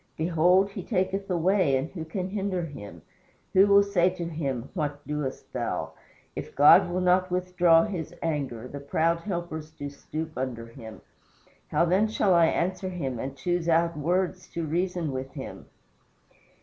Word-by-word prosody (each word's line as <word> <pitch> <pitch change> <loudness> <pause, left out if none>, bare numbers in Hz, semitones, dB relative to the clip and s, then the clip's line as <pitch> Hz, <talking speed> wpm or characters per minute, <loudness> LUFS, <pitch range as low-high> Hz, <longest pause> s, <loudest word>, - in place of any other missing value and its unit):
Behold, 180 +4 +3
he - - -6
taketh 195 -1 -1
away, 180 -4 +2
and 135 +5 -4
who 170 -4 -6
can 180 +3 -4
hinder 195 -4 -2
him? 100 - -10 0.5
who 195 +2 +6
will 200 0 +6
say 190 -3 +2
unto 180 -2 -5
him, 140 -7 -3
What 145 -4 -3
doest 150 -3 -4
thou? - - -2 0.4
If - - -7
God 145 +4 +7
will 180 +1 -1
not 180 +1 +3
withdraw 180 -2 +3
his 180 -7 -5
anger, 135 -7 -2
the 140 - -7
proud 165 +4 +1
helpers 170 -4 -5
do 145 -3 -7
stoop 155 +3 -6
under 125 -3 -4
him. 115 -2 -11 0.7
How - - +2
then 190 +5 +3
shall 210 -3 +2
I 170 -1 +5
answer 185 +3 -1
him 135 -10 -4
and 135 +2 -5
choose 175 +3 -1
out 165 0 +3
words 180 +4 -1
to 170 -1 -2
reason 175 0 -1
with 130 0 -5
him?" - - -8
170 Hz, 160 wpm, -27 LUFS, 145-185 Hz, 0.7 s, God